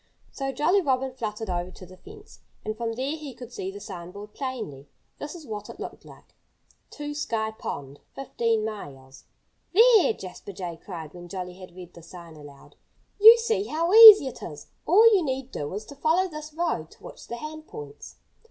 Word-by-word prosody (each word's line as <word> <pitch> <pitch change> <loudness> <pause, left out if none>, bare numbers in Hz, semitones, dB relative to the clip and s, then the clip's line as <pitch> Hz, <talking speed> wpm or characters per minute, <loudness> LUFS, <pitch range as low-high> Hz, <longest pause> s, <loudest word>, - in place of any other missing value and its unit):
So 270 -1 -4
Jolly 350 +8 +2
Robin 265 -4 0
fluttered 220 -3 -5
over 175 0 -3
to 185 - -13
the 185 +1 -14
fence. 415 - -15 0.3
And 215 - -3
from 230 0 -3
there 265 +6 -3
he 295 -5 -9
could 245 -1 -11
see 190 - -5
the 200 +1 -9
sign 185 -5 -9
board 205 +3 -11
plainly. 220 - -6 0.3
This 290 +4 -7
is 330 -3 -11
what 210 -4 -7
it - - -11
looked - - -8
like: - - -17 0.6
TO 295 0 -7
SKY 225 -7 -2
POND, 140 0 -6 0.2
15 230 -5 -1
MILES 135 -11 -9 0.5
"There!" 450 - +6
Jasper 190 +1 -10
Jay 175 -3 -7
cried, 165 -5 -8
when 175 -1 -11
Jolly 180 -1 -6
had 185 -2 -13
read 180 -1 -11
the 170 - -13
sign 170 -1 -12
aloud. 145 -2 -15 0.4
"You 445 +3 +10
see 450 -3 -1
how 335 +1 -1
easy 435 -7 +11
it 260 - -7
is. 150 -3 -10 0.2
All 410 +7 +6
you 380 -4 +3
need 265 -2 -4
do 145 0 -5
is 210 +1 -6
to 285 - -12
follow 325 +6 +1
this 305 -2 -9
road 310 - -2
to - - -21
which - - -12
the 235 - -5
hand 310 +3 -8
points." 145 -1 -10
225 Hz, 195 wpm, -25 LUFS, -, 0.6 s, easy